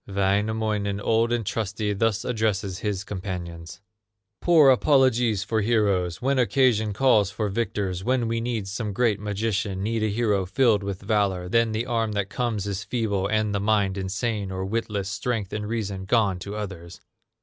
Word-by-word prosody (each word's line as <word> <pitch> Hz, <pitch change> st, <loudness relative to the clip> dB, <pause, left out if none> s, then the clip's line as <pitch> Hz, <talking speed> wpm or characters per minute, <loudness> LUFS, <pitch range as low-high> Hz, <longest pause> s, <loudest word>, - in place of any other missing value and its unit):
Wainamoinen, 100 Hz, +1 st, 0 dB
old 115 Hz, +2 st, +1 dB
and 120 Hz, -2 st, 0 dB
trusty, 105 Hz, 0 st, -2 dB
Thus 105 Hz, 0 st, 0 dB
addresses 105 Hz, -5 st, -1 dB
his 105 Hz, -3 st, -2 dB
companions: 90 Hz, -4 st, -6 dB, 0.6 s
"Poor 160 Hz, -6 st, +6 dB
apologies 125 Hz, -6 st, +3 dB
for 110 Hz, +1 st, 0 dB
heroes! 100 Hz, -6 st, +1 dB
When 135 Hz, 0 st, +2 dB
occasion 120 Hz, -4 st, +2 dB
calls 105 Hz, -3 st, +3 dB
for 105 Hz, +1 st, -2 dB
victors, 95 Hz, -3 st, -2 dB
When 125 Hz, 0 st, +1 dB
we 115 Hz, 0 st, -1 dB
need 115 Hz, -4 st, -2 dB
some 105 Hz, +1 st, -4 dB
great 110 Hz, -1 st, +1 dB
magician, 105 Hz, -2 st, -2 dB
Need 110 Hz, +1 st, -1 dB
a 110 Hz, -, +1 dB
hero 105 Hz, -3 st, 0 dB
filled 110 Hz, 0 st, +3 dB
with 100 Hz, -1 st, -5 dB
valor, 100 Hz, -4 st, 0 dB
Then 115 Hz, +3 st, +2 dB
the 110 Hz, +2 st, -2 dB
arm 115 Hz, -3 st, -1 dB
that 100 Hz, 0 st, -2 dB
comes 115 Hz, -5 st, -2 dB
is 100 Hz, -1 st, -3 dB
feeble, 100 Hz, -5 st, -1 dB
And 110 Hz, 0 st, 0 dB
the 100 Hz, -, 0 dB
mind 100 Hz, -2 st, +1 dB
insane 100 Hz, +2 st, -2 dB
or 95 Hz, 0 st, -3 dB
witless, 105 Hz, -2 st, -2 dB
Strength 105 Hz, 0 st, -3 dB
and 105 Hz, -1 st, -3 dB
reason 100 Hz, -4 st, -3 dB
gone 100 Hz, -3 st, +2 dB
to 100 Hz, +3 st, -6 dB
others!" 95 Hz, -5 st, -7 dB
105 Hz, 165 wpm, -25 LUFS, 100-115 Hz, 0.6 s, Poor